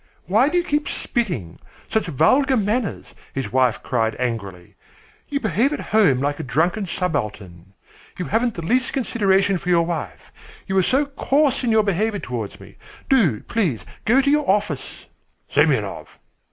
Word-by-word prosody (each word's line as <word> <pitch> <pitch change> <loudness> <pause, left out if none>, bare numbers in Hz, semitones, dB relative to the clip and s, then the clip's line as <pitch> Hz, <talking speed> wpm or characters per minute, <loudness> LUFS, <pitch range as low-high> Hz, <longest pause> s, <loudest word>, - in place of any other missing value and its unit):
"Why 220 - +3
do 355 - 0
you 350 - +2
keep 295 -3 -1
spitting? 170 - -3 0.3
Such 220 - -1
vulgar 255 - +3
manners!" 215 +2 -2 0.2
his 130 -6 -3
wife 130 -4 +2
cried 115 -3 0
angrily. 100 -8 -4 0.6
"You 280 - -1
behave 225 - +1
at - - -3
home 200 -12 +3
like 145 +1 -1
a - - -3
drunken 175 - 0
subaltern. 105 - -4 0.4
You 180 - -3
haven't 230 +1 0
the 170 - -5
least 250 +6 +1
consideration 200 -7 +1
for 180 - -5
your 170 -1 +4
wife. 160 - -5 0.3
You 190 - -3
are - - +5
so 265 +10 +2
coarse 280 -1 +1
in 240 - +1
your 220 -1 +4
behaviour 205 +2 0
towards 120 - -5
me! - - -15 0.3
Do, 190 - +3
please, 180 - -1 0.2
go 250 +5 +4
to 280 +1 +2
your 295 -4 +1
office." 205 +1 -1 0.5
"Semyonov." - - +1
195 Hz, 160 wpm, -21 LUFS, -, 0.6 s, are